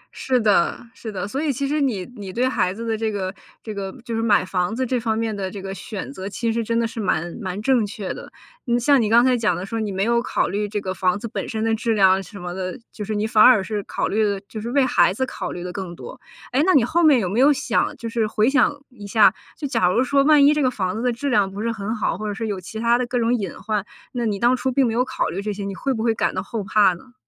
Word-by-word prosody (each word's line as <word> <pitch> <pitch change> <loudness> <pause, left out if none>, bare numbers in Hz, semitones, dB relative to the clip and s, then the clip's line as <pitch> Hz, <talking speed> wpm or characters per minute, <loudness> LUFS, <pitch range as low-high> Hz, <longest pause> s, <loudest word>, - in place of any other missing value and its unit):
是 255 -1 +1
的 205 -6 +3 0.2
是 225 -3 -7
的。 190 0 -4
所 270 +7 -3
以 310 -2 +1
其 275 +1 -2
实 295 +1 0
你 215 -9 0
你 200 -4 -7
对 250 +6 +1
孩 185 -8 +1
子 230 +4 -6
的 225 -1 0
这 220 0 -1
个 190 -2 -3 0.3
这 215 - -6
个， 195 -1 -4
就 230 -2 -3
是 225 - 0
买 205 -4 +3
房 185 +2 -1
子 260 +1 -1
这 250 0 0
方 220 -1 -1
面 225 -2 -1
的 190 -2 -3
这 200 - -7
个 195 0 -5
选 210 +4 -6
择 190 -5 -6
其 225 +3 -2
实 230 0 -1
真 230 +1 0
的 230 - +1
是 230 0 -8
蛮 175 -3 -1
蛮 190 -1 -4
正 245 -3 +2
确 200 -1 -5
的。 - - -10 0.4
嗯 240 0 +2
像 275 +1 +4
你 215 - 0
刚 235 +2 +6
才 255 -1 +4
讲 215 -6 +1
的 180 +2 -5
说， 225 +3 -4
你 215 -2 -2
没 190 0 -1
有 235 +1 +2
考 - - 0
虑 205 +2 -2
这 210 - -2
个 190 -2 -4
房 185 +1 +1
子 230 - -5
本 - - -5
身 220 -1 -2
的 225 0 +1
质 230 +1 0
量 190 -2 +4
什 200 +2 -11
么 175 0 -5
的， 185 +5 -5
就 210 - -7
是 215 +1 -3
你 210 +1 0
反而 220 -1 +6
是 210 +1 -3
考 - - -2
虑 215 +1 +1
的 200 -1 0
就 215 - -7
是 235 - -4
为 275 -1 +3
孩 175 -7 +4
子 260 +6 -1
考 - - -5
虑 175 - -6
得 180 0 -6
更 185 -3 -6
多。 260 - -10 0.3
诶 265 +4 +2
那 375 +2 +4
你 265 - +6
后 340 +8 +1
面 295 -6 +6
有 190 - -1
没 200 +6 -1
有 280 +3 +6
想 270 -4 0
就 230 - -6
是 225 -1 0
回 215 +1 +1
想 290 +1 +4 0.2
一 210 -6 -11
下， 215 +1 +5 0.2
就 290 - -3
假 185 -10 +2
如 235 +7 +2
说 275 +1 +3
万 295 -1 +6
一 295 - +6
这 300 - 0
个 255 - +3
房 190 -5 -2
子 225 - -3
的 245 0 +1
质 280 +5 -3
量 200 -4 +2
不 200 - -8
是 230 +1 0
很 220 +1 -3
好， 210 - -1
或 215 - -4
者 205 - -2
说 225 - -3
有 200 -3 -3
其 220 +5 -7
它 235 +1 +3
的 250 - 0
各 245 - -1
种 235 0 +2
隐 200 -7 -2
患， 210 -1 -2 0.3
那 240 -2 -2
你 205 -2 -1
当 240 +4 +3
初 260 +1 -1
并 265 0 +3
没 225 - 0
有 245 +2 +2
考 260 0 -2
虑 190 - -4
这 210 +1 -3
些， 200 0 -5
你 195 - -4
会 275 - -2
不 225 -4 -2
会 230 -1 +2
感 - - 0
到 - - -2
后 225 -3 -4
怕 195 0 +4
呢？ 245 +9 -14
220 Hz, 325 characters per minute, -22 LUFS, 200-245 Hz, 0.4 s, 刚